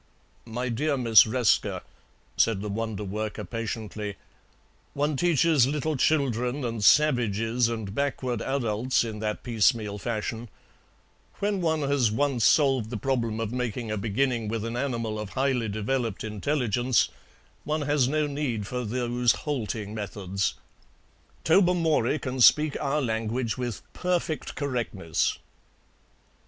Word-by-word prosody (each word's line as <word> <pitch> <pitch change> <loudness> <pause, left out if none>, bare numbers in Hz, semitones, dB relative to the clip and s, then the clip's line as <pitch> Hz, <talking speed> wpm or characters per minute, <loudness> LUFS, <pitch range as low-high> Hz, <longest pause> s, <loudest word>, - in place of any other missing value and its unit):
"My 125 +3 -3
dear 140 +5 0
Miss 115 -4 +7
Resker," 120 0 +1 0.5
said 110 -4 +2
the 105 - -3
wonderworker 105 -1 -4
patiently, 110 -2 -4 0.8
"one 145 +1 0
teaches 160 -3 +3
little 150 +2 -1
children 130 -2 +1
and 115 -3 -3
savages 120 -4 +3
and 110 -4 -4
backward 130 -3 -2
adults 125 -2 0
in 110 -2 -5
that 105 0 -3
piecemeal 110 -3 +1
fashion; 115 +1 -4 0.9
when 200 -1 -1
one 160 -2 +1
has 140 -5 +2
once 130 0 0
solved 135 -7 +3
the 120 - -4
problem 115 -3 -1
of 115 -1 -2
making 120 -2 -3
a - - 0
beginning 115 +3 0
with 110 0 -2
an 115 +1 -4
animal 115 -4 -2
of 105 -2 -5
highly 130 -4 0
developed 110 +1 -2
intelligence 120 +2 +1 0.5
one 155 0 -1
has 145 -3 +2
no 150 +2 +1
need 140 -7 -2
for 125 +4 -3
those 120 +1 +1
halting 110 -7 -3
methods. 100 -2 -3 0.9
Tobermory 165 -3 +3
can 130 -3 -4
speak 150 +4 +6
our 145 +1 0
language 115 +1 -1
with 125 -4 -4
perfect 175 -3 -2
correctness." 115 - -1
120 Hz, 125 wpm, -26 LUFS, 110-140 Hz, 0.9 s, Miss